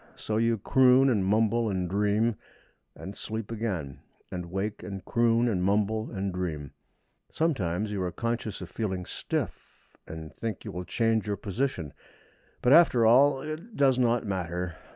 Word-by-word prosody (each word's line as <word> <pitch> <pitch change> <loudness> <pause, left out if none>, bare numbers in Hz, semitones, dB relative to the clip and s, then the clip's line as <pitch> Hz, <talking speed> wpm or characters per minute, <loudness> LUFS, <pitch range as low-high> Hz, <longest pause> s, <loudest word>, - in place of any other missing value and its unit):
So 110 - -3
you 115 0 +2
croon, 130 +4 +5
and 105 -5 +1
mumble, 110 +3 +2
and 95 -2 -1
dream, 105 +4 +1 0.6
and 95 +1 -8
sleep 110 0 -5
again; 95 - -3 0.3
and 90 -1 -5
wake, 100 +4 -3
and 95 0 -7
croon, 115 0 +2
and 95 -6 0
mumble, 105 +3 +1
and 95 -2 -3
dream. 80 -6 -4 0.6
Sometimes 105 - -1
you 100 -2 -2
are 90 -1 -1
conscious 115 +1 -3
of - - -8
feeling 95 -5 -3
stiff, - - -5
and 80 -1 -8
think 110 -4 -5
you - - -5
will 90 0 -5
change 115 -1 +1
your 100 -1 -1
position; 100 - -3 0.7
but, 125 - +5
after 130 -9 +6
all, 135 +4 +5
it 160 +9 -7
does 135 -2 +4
not 120 -1 +2
matter. 90 -3 -3
105 Hz, 155 wpm, -28 LUFS, 95-120 Hz, 0.7 s, after